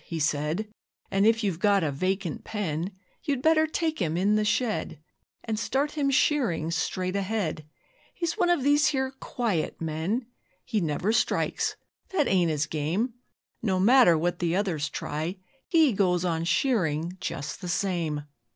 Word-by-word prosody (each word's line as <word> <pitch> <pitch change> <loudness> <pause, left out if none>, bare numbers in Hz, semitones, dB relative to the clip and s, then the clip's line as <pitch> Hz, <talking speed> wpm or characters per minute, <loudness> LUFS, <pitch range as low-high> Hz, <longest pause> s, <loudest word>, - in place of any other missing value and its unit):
he 165 - -5
said, 155 +7 0 0.4
And 195 +2 +3
if 225 0 +3
you've 190 -5 -1
got 200 -2 +3
a 150 - 0
vacant 185 +3 -2
pen 180 -4 -3 0.3
You'd 275 -3 -2
better 315 0 +4
take 315 0 -1
him 165 -1 0
in 200 +4 +3
the 215 - +2
shed 210 - -1 0.4
And 220 -2 -2
start 275 +6 0
him 290 -2 0
shearing 250 - +2
straight 185 +3 -1
ahead, 190 -7 -2 0.5
He's 340 -2 -1
one 360 -5 +2
of 345 -7 +2
these 290 +1 +4
here 265 -2 0
quiet 220 -10 -2
men. 165 +10 -2 0.4
'He 220 -4 0
never 170 +6 0
strikes 235 - +1 0.3
that 315 -7 +1
ain't 180 -3 +3
his 150 -1 0
game; 160 - -1 0.5
No 190 -5 +1
matter 220 -4 +6
what 175 +2 -1
the 170 -1 0
others 175 -7 0
try 160 +6 -4 0.3
HE 320 -7 +4
goes 185 -3 +2
on 165 -1 0
shearing 175 - +1
just 150 +2 -5
the 180 - -5
same. 170 -5 -1
190 Hz, 160 wpm, -27 LUFS, 165-245 Hz, 0.5 s, matter